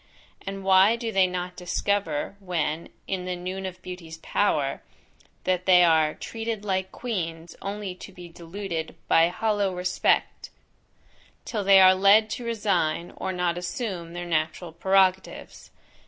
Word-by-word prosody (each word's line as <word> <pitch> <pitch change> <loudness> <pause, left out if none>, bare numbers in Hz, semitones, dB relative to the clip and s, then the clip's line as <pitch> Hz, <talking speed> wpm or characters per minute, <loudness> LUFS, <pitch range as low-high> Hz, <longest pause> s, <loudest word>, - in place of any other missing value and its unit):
And 195 0 -5
why 190 +3 +5
do 230 -1 -4
they 190 -3 +4
not 180 0 -4
discover, 180 -2 -1
when 170 -4 -2 0.2
"in 185 -2 -3
the 180 0 -2
noon 185 +2 -5
of 185 0 -9
beauty's 170 -3 -8
power," 145 -9 0 0.6
that 185 0 -1
they 180 -1 +7
are 160 -2 +3
treated 225 -2 -5
like 190 -1 -1
queens 170 -8 -5
only 200 -1 -4
to 185 - -11
be 180 -2 -11
deluded 170 0 -6
by 165 0 +5
hollow 200 0 0
respect, 180 0 0 1.0
till 215 -3 -3
they 195 0 +7
are 185 0 +8
led 200 +3 +5
to 245 - -4
resign, 185 -8 -1
or 190 - -3
not 175 -1 -1
assume, 180 -3 -5
their 175 0 -5
natural 160 +1 -2
prerogatives? 190 +2 0
185 Hz, 140 wpm, -25 LUFS, 170-195 Hz, 1.0 s, are